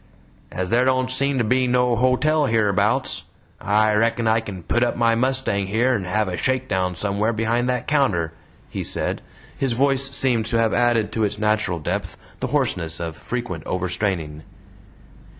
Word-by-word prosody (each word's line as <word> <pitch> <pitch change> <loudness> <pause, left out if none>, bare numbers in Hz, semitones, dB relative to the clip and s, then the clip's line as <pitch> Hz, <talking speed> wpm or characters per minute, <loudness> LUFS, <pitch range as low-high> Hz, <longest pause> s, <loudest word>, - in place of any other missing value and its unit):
"As 90 0 -3
there 120 +2 +4
don't 130 0 +1
seem 140 +1 +1
to 120 - +2
be 125 +3 +2
no 125 -1 +2
hotel 140 +5 +2
hereabouts, 105 -3 +1 0.3
I 105 +1 +2
reckon 115 +2 +1
I 110 0 +3
kin 100 -5 -8
put 120 - 0
up 120 - 0
my 115 -1 +2
mustang 120 -5 0
here 115 +6 +2
and 100 -6 -2
have 105 +3 0
a 90 - -3
shakedown 105 -9 -1
somewhere 105 +5 -1
behind 115 +3 0
that 125 -1 -2
counter," 100 - +1 0.3
he - - -5
said. - - -1 0.3
His 135 -3 0
voice 135 +2 +2
seemed 125 -5 +1
to 115 - 0
have 115 -1 +2
added 120 -3 +2
to 110 - -1
its 105 0 -1
natural 105 -4 0
depth 75 - -4 0.2
the - - -2
hoarseness 80 -2 -1
of 85 -2 -4
frequent 115 -5 -5
overstraining. 90 -4 -2
115 Hz, 170 wpm, -22 LUFS, 100-125 Hz, 0.3 s, there